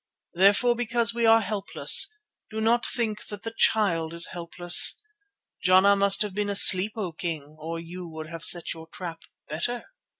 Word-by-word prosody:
Therefore 200 Hz, +7 st, +1 dB
because 235 Hz, 0 st, -1 dB
we 235 Hz, -1 st, -2 dB
are 225 Hz, 0 st, +3 dB
helpless, 220 Hz, -, +3 dB, 0.4 s
do 220 Hz, -, -8 dB
not 230 Hz, +2 st, -1 dB
think 220 Hz, -4 st, -5 dB
that 205 Hz, +1 st, -11 dB
the 225 Hz, -, -8 dB
Child 170 Hz, -8 st, -1 dB
is 170 Hz, -, 0 dB
helpless. 175 Hz, 0 st, +3 dB, 0.6 s
Jana 190 Hz, +2 st, +2 dB
must 200 Hz, +1 st, +2 dB
have 205 Hz, -2 st, -8 dB
been 205 Hz, +1 st, -5 dB
asleep, 200 Hz, 0 st, +5 dB
O 200 Hz, -6 st, -7 dB
King, 155 Hz, -3 st, -8 dB
or 165 Hz, +2 st, -8 dB
you 175 Hz, +2 st, -11 dB
would 160 Hz, -1 st, -11 dB
have 165 Hz, 0 st, -11 dB
set 175 Hz, -2 st, +1 dB
your 160 Hz, 0 st, -15 dB
trap 165 Hz, -1 st, -11 dB, 0.3 s
better." 235 Hz, +11 st, -6 dB
195 Hz, 165 wpm, -23 LUFS, 170-220 Hz, 0.6 s, asleep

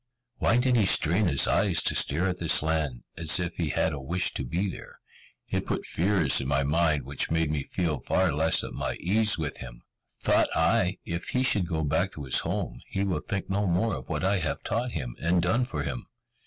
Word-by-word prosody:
Why 115 Hz, -, +2 dB
did 125 Hz, 0 st, +2 dB
he 105 Hz, -, +3 dB
strain 90 Hz, +4 st, +3 dB
his 70 Hz, -5 st, +3 dB
eyes 90 Hz, -6 st, +2 dB
to -, -, +2 dB
stare 85 Hz, +7 st, +1 dB
at 90 Hz, -1 st, -3 dB
this 85 Hz, -3 st, +3 dB
land, 80 Hz, -6 st, -1 dB
as 85 Hz, +3 st, +2 dB
if 90 Hz, -1 st, -2 dB
he 80 Hz, -3 st, -1 dB
had 80 Hz, -, 0 dB
a 70 Hz, -, -5 dB
wish 85 Hz, +7 st, 0 dB
to -, -, -3 dB
be 85 Hz, +11 st, -2 dB
there? 95 Hz, -, -9 dB, 0.5 s
It -, -, -2 dB
put -, -, -2 dB
fears 90 Hz, -5 st, +2 dB
in 65 Hz, -, -4 dB
my 70 Hz, 0 st, +1 dB
mind 75 Hz, 0 st, +1 dB
which 70 Hz, +2 st, -1 dB
made 80 Hz, -1 st, 0 dB
me 75 Hz, -2 st, -1 dB
feel 80 Hz, 0 st, -2 dB
far, 95 Hz, +2 st, +1 dB
less 80 Hz, +2 st, +2 dB
at -, -, -6 dB
my -, -, -2 dB
ease 105 Hz, +3 st, +2 dB
with 80 Hz, -3 st, -4 dB
him. -, -, -10 dB, 0.4 s
Thought -, -, +2 dB
I, -, -, +2 dB
if 85 Hz, +1 st, -4 dB
he 130 Hz, -, 0 dB
should 100 Hz, -8 st, +3 dB
go 80 Hz, -2 st, -2 dB
back 75 Hz, -, 0 dB
to 75 Hz, -, -8 dB
his 65 Hz, -, +2 dB
home, -, -, -4 dB
he 95 Hz, -, -2 dB
will 90 Hz, -6 st, -1 dB
think 100 Hz, -1 st, -4 dB
no 100 Hz, +1 st, -1 dB
more 95 Hz, +5 st, +1 dB
of 65 Hz, -5 st, -7 dB
what -, -, -2 dB
I 100 Hz, 0 st, +2 dB
have 80 Hz, -5 st, -2 dB
taught 120 Hz, +3 st, -2 dB
him, 65 Hz, -6 st, -5 dB
and 85 Hz, +2 st, +2 dB
done 95 Hz, +9 st, +1 dB
for 120 Hz, -, -4 dB
him. -, -, -5 dB
85 Hz, 225 wpm, -27 LUFS, 75-95 Hz, 0.5 s, he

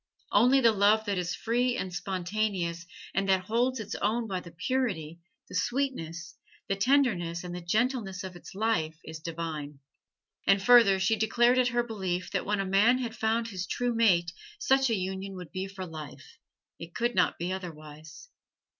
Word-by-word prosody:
Only 265 Hz, +3 st, +5 dB
the 230 Hz, -2 st, +6 dB
love 215 Hz, +1 st, +3 dB
that 200 Hz, -3 st, -1 dB
is 180 Hz, 0 st, -2 dB
free 245 Hz, +2 st, 0 dB
and 185 Hz, -6 st, -4 dB
spontaneous 180 Hz, -2 st, -2 dB, 0.3 s
and 195 Hz, 0 st, 0 dB
that 190 Hz, -1 st, +3 dB
holds 240 Hz, +4 st, +1 dB
its 210 Hz, -2 st, -5 dB
own 225 Hz, +3 st, 0 dB
by 190 Hz, -4 st, -3 dB
the 175 Hz, -, -11 dB
purity, 170 Hz, -, -2 dB, 0.3 s
the -, -, -13 dB
sweetness, 185 Hz, -, -2 dB, 0.3 s
the 195 Hz, -, 0 dB
tenderness 195 Hz, -8 st, +1 dB
and 175 Hz, -1 st, -6 dB
the 180 Hz, -, -5 dB
gentleness 210 Hz, 0 st, -1 dB
of 185 Hz, -1 st, -7 dB
its 175 Hz, -, -12 dB
life 195 Hz, -7 st, 0 dB
is 160 Hz, 0 st, -8 dB
divine. 160 Hz, -3 st, -5 dB, 0.7 s
And 195 Hz, 0 st, +5 dB
further, 205 Hz, -3 st, +6 dB
she 190 Hz, +4 st, +2 dB
declared 240 Hz, +3 st, +3 dB
it 250 Hz, -, +4 dB
her 240 Hz, -1 st, +1 dB
belief 190 Hz, -6 st, -3 dB
that 190 Hz, -1 st, -2 dB
when 210 Hz, 0 st, 0 dB
a 195 Hz, -, 0 dB
man 205 Hz, +6 st, +4 dB
had 240 Hz, -3 st, -4 dB
found 225 Hz, +1 st, 0 dB
his 185 Hz, -3 st, -5 dB
true 245 Hz, -1 st, -1 dB
mate 180 Hz, -7 st, +3 dB, 0.3 s
such 270 Hz, -, +3 dB
a 225 Hz, -, +2 dB
union 190 Hz, +1 st, -4 dB
would 180 Hz, -3 st, -9 dB
be 190 Hz, +1 st, -4 dB
for 190 Hz, -1 st, -7 dB
life 155 Hz, -4 st, -10 dB, 0.4 s
it 165 Hz, 0 st, -10 dB
could 240 Hz, +1 st, 0 dB
not 180 Hz, -1 st, +2 dB
be 175 Hz, +2 st, -2 dB
otherwise. 155 Hz, -, -9 dB
195 Hz, 180 wpm, -29 LUFS, 175-230 Hz, 0.7 s, the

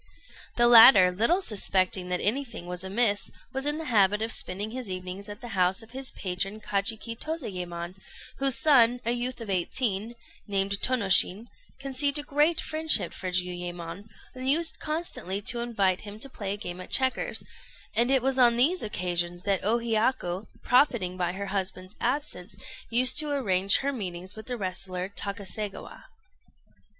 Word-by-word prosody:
The 240 Hz, -, +3 dB
latter, 225 Hz, -6 st, +9 dB
little 235 Hz, -, +1 dB
suspecting 185 Hz, -, +1 dB
that 180 Hz, 0 st, -1 dB
anything 230 Hz, -3 st, -1 dB
was 180 Hz, 0 st, -5 dB
amiss, 205 Hz, +1 st, +1 dB, 0.2 s
was 270 Hz, +2 st, -3 dB
in 295 Hz, +1 st, 0 dB
the 320 Hz, -, -6 dB
habit 210 Hz, -4 st, +2 dB
of 225 Hz, -, -2 dB
spending 205 Hz, +2 st, -3 dB
his 250 Hz, -3 st, -6 dB
evenings 185 Hz, +2 st, -6 dB
at 205 Hz, +3 st, -9 dB
the 240 Hz, -, -8 dB
house 190 Hz, +1 st, 0 dB
of 225 Hz, -, -16 dB
his 265 Hz, +1 st, 0 dB
patron 195 Hz, +3 st, -3 dB
Kajiki 215 Hz, +3 st, -3 dB
Tozayémon, 180 Hz, -, -5 dB, 0.5 s
whose 270 Hz, -2 st, +4 dB
son, 245 Hz, -5 st, +5 dB
a 235 Hz, -, +1 dB
youth 245 Hz, +1 st, -2 dB
of 225 Hz, -, -7 dB
eighteen, 210 Hz, +4 st, -1 dB, 0.3 s
named 195 Hz, -1 st, 0 dB
Tônoshin, 210 Hz, -2 st, +2 dB, 0.3 s
conceived 275 Hz, +1 st, +1 dB
a 295 Hz, -, -3 dB
great 295 Hz, +4 st, +1 dB
friendship 315 Hz, 0 st, 0 dB
for 185 Hz, -, -5 dB
Jiuyémon, 180 Hz, +1 st, -4 dB, 0.2 s
and 260 Hz, 0 st, -3 dB
used 320 Hz, +3 st, +3 dB
constantly 305 Hz, -, -4 dB
to 235 Hz, +3 st, +2 dB
invite 205 Hz, -6 st, 0 dB
him 205 Hz, 0 st, -10 dB
to 275 Hz, -, 0 dB
play 200 Hz, -5 st, -4 dB
a -, -, -6 dB
game 180 Hz, -3 st, -7 dB
at -, -, -11 dB
checkers; 260 Hz, -1 st, +1 dB, 0.5 s
and 235 Hz, +2 st, +2 dB
it 265 Hz, -2 st, +3 dB
was 265 Hz, 0 st, 0 dB
on 240 Hz, -2 st, +5 dB
these 330 Hz, +9 st, +3 dB
occasions 175 Hz, -3 st, -1 dB
that 195 Hz, -2 st, 0 dB
O 220 Hz, +4 st, +2 dB
Hiyaku, 220 Hz, -4 st, -1 dB, 0.2 s
profiting 240 Hz, -9 st, +2 dB
by 175 Hz, -1 st, -2 dB
her 200 Hz, +1 st, -5 dB
husband's 190 Hz, 0 st, -3 dB
absence, 230 Hz, -10 st, -3 dB, 0.3 s
used 250 Hz, +4 st, +4 dB
to 305 Hz, -1 st, 0 dB
arrange 200 Hz, -9 st, +3 dB
her 280 Hz, +1 st, -1 dB
meetings 185 Hz, -5 st, -7 dB
with 220 Hz, 0 st, -11 dB
the 250 Hz, -1 st, -4 dB
wrestler 185 Hz, -1 st, -4 dB
Takaségawa. 200 Hz, 0 st, -6 dB
210 Hz, 160 wpm, -27 LUFS, 185-255 Hz, 0.5 s, latter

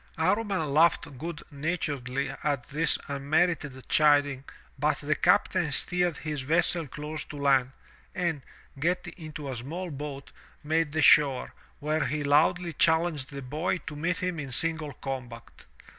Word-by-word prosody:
*' -, -, -30 dB
Amman 185 Hz, -3 st, +1 dB
laughed 155 Hz, -4 st, +3 dB
good 165 Hz, 0 st, -5 dB
naturedly 140 Hz, -4 st, -2 dB
at 140 Hz, -5 st, -1 dB
this 150 Hz, +2 st, +2 dB
unmerited 145 Hz, -1 st, 0 dB
chiding 145 Hz, -3 st, +3 dB, 0.3 s
but 150 Hz, +2 st, +2 dB
the 150 Hz, +1 st, 0 dB
captain 180 Hz, -3 st, +2 dB
steered 175 Hz, +2 st, 0 dB
his 150 Hz, -3 st, -4 dB
vessel 165 Hz, +3 st, +1 dB
close 150 Hz, +3 st, -5 dB
to -, -, -10 dB
land, 135 Hz, -2 st, +3 dB, 0.4 s
and, 170 Hz, -5 st, -1 dB, 0.4 s
getting 175 Hz, +2 st, -1 dB
into 155 Hz, -3 st, -8 dB
a 130 Hz, -, -4 dB
small 165 Hz, +9 st, -5 dB
boat, 140 Hz, -1 st, -7 dB, 0.3 s
made 160 Hz, 0 st, +1 dB
the 160 Hz, 0 st, +1 dB
shore, 140 Hz, -4 st, +5 dB, 0.3 s
where 155 Hz, 0 st, 0 dB
he 150 Hz, +3 st, -2 dB
loudly 165 Hz, +4 st, +3 dB
challenged 160 Hz, -5 st, +2 dB
the 140 Hz, -1 st, -6 dB
boy 155 Hz, +9 st, -1 dB
to 150 Hz, -, -6 dB
meet 170 Hz, +4 st, -1 dB
him 180 Hz, -4 st, -2 dB
in 135 Hz, -3 st, -5 dB
single 160 Hz, +1 st, -1 dB
combat. 125 Hz, -3 st, -7 dB
150 Hz, 145 wpm, -28 LUFS, 140-165 Hz, 0.4 s, shore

